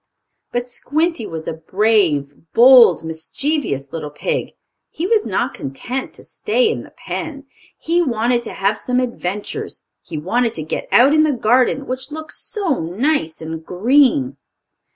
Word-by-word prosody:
But 245 Hz, 0 st, -2 dB
Squinty 310 Hz, +1 st, -1 dB
was 160 Hz, -1 st, -7 dB
a -, -, -2 dB
brave, 165 Hz, -4 st, +1 dB, 0.2 s
bold, 245 Hz, -3 st, +7 dB
mischievous 160 Hz, -, -3 dB
little 160 Hz, -3 st, -4 dB
pig. 485 Hz, -, -3 dB, 0.4 s
He 330 Hz, -, -4 dB
was 430 Hz, +2 st, +2 dB
not -, -, -1 dB
content 245 Hz, -, -5 dB
to -, -, -13 dB
stay 445 Hz, +1 st, 0 dB
in -, -, -4 dB
the -, -, -13 dB
pen. 300 Hz, -4 st, -6 dB, 0.3 s
He 340 Hz, +2 st, +1 dB
wanted 240 Hz, -4 st, +1 dB
to -, -, -6 dB
have 200 Hz, +2 st, 0 dB
some 250 Hz, 0 st, 0 dB
adventures. 210 Hz, -5 st, -4 dB, 0.2 s
He 160 Hz, -, -7 dB
wanted 230 Hz, +9 st, 0 dB
to 155 Hz, -, -3 dB
get 155 Hz, -, -4 dB
out 270 Hz, +4 st, +6 dB
in 310 Hz, 0 st, +5 dB
the 310 Hz, -, +2 dB
garden, 255 Hz, +2 st, +2 dB
which 260 Hz, +1 st, -4 dB
looked 315 Hz, +1 st, -7 dB
so 380 Hz, -, -1 dB
nice 175 Hz, -, -1 dB
and 160 Hz, 0 st, -6 dB
green. 190 Hz, -, +2 dB
245 Hz, 150 wpm, -19 LUFS, -, 0.4 s, bold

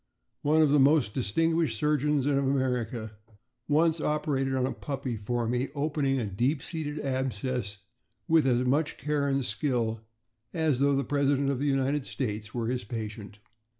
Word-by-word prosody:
One 155 Hz, +2 st, +4 dB
of 150 Hz, -, +3 dB
the 145 Hz, -, +5 dB
most 135 Hz, -5 st, +4 dB
distinguished 165 Hz, +7 st, +1 dB
surgeons 150 Hz, -2 st, +1 dB
of 145 Hz, -1 st, +2 dB
America 125 Hz, -5 st, -1 dB, 0.6 s
once 160 Hz, +2 st, +2 dB
operated 135 Hz, -3 st, 0 dB
on 130 Hz, -1 st, +1 dB
a 130 Hz, -, -1 dB
puppy 135 Hz, -4 st, -4 dB
for 115 Hz, +2 st, -2 dB
me, 125 Hz, +3 st, 0 dB
opening 145 Hz, -2 st, 0 dB
a 115 Hz, -, -1 dB
deep 125 Hz, +9 st, -1 dB
seated 155 Hz, -3 st, -4 dB
abscess 130 Hz, -5 st, -2 dB, 0.5 s
with 160 Hz, -4 st, +4 dB
as 125 Hz, 0 st, +2 dB
much 145 Hz, +4 st, +1 dB
care 145 Hz, +1 st, -1 dB
and 135 Hz, -2 st, 0 dB
skill 115 Hz, -1 st, -1 dB, 0.5 s
as 155 Hz, -5 st, +1 dB
though 140 Hz, 0 st, +3 dB
the 140 Hz, -, +1 dB
President 140 Hz, 0 st, +1 dB
of 135 Hz, -, -2 dB
the 145 Hz, -, 0 dB
United 135 Hz, 0 st, 0 dB
States 105 Hz, -5 st, -4 dB
were 120 Hz, -1 st, -2 dB
his 125 Hz, 0 st, -2 dB
patient. 105 Hz, -1 st, -6 dB
135 Hz, 160 wpm, -28 LUFS, 120-145 Hz, 0.6 s, the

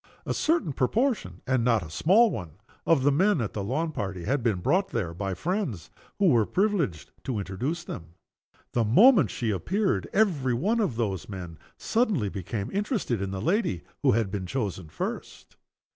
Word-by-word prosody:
A -, -, -1 dB
certain 310 Hz, -, +1 dB
proportion 230 Hz, -, 0 dB
and 130 Hz, -2 st, +1 dB
not 115 Hz, -5 st, +2 dB
a 80 Hz, -, -11 dB
small 205 Hz, -, +4 dB
one 90 Hz, -, -6 dB, 0.3 s
of 160 Hz, -6 st, +4 dB
the 145 Hz, -, +4 dB
men 185 Hz, +5 st, +3 dB
at 110 Hz, -4 st, -2 dB
the 100 Hz, -, -3 dB
lawn 155 Hz, +10 st, -1 dB
party 95 Hz, -, -4 dB
had 135 Hz, +8 st, 0 dB
been 115 Hz, -5 st, +1 dB
brought 190 Hz, -, +2 dB
there 90 Hz, -8 st, -2 dB
by 95 Hz, +1 st, -3 dB
friends 170 Hz, -, -3 dB, 0.3 s
who 200 Hz, -3 st, +4 dB
were 115 Hz, -7 st, +3 dB
privileged 180 Hz, -, 0 dB
to 125 Hz, -5 st, -2 dB
introduce 125 Hz, -, -3 dB
them. 85 Hz, -, -8 dB, 0.6 s
The 120 Hz, -, +2 dB
moment 200 Hz, -, +6 dB
she 115 Hz, -3 st, -2 dB
appeared 190 Hz, -, 0 dB
every 155 Hz, -, +2 dB
one 210 Hz, -, +1 dB
of 200 Hz, -, 0 dB
those 105 Hz, -6 st, -2 dB
men 90 Hz, -5 st, -7 dB, 0.2 s
suddenly 215 Hz, -, +1 dB
became 100 Hz, +2 st, -4 dB
interested 200 Hz, -, -1 dB
in 95 Hz, -, -2 dB
the 95 Hz, 0 st, -4 dB
lady 175 Hz, -, 0 dB, 0.2 s
who -, -, +4 dB
had 110 Hz, -3 st, 0 dB
been 95 Hz, -2 st, -3 dB
chosen 95 Hz, -8 st, -3 dB
first. -, -, -6 dB
125 Hz, 175 wpm, -27 LUFS, -, 0.6 s, moment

